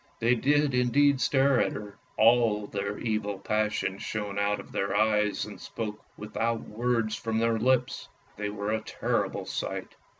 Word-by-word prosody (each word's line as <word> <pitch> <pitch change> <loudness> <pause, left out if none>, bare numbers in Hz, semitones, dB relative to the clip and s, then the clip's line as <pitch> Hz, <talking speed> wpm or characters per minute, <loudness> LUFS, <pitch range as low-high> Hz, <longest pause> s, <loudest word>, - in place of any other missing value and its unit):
They 115 +2 +3
did 145 +3 +2
indeed 130 +3 +3
stare 135 -1 +3
at - - 0
her, 105 -1 -8 0.2
all 110 -2 +4
their 100 0 -3
evil 105 -3 -2
passions 105 -1 -1
shone 105 -2 -3
out 100 0 +1
of - - -11
their 100 +1 -1
eyes 105 0 +2
and 105 -3 -10
spoke 105 -2 -5
without 115 +2 -2
words 115 0 -1
from 115 -1 -2
their 115 0 +2
lips. 125 +1 +1 0.3
They 105 0 -3
were 105 0 -3
a 110 0 0
terrible - - -2
sight. - - -4
110 Hz, 160 wpm, -28 LUFS, 105-120 Hz, 0.3 s, all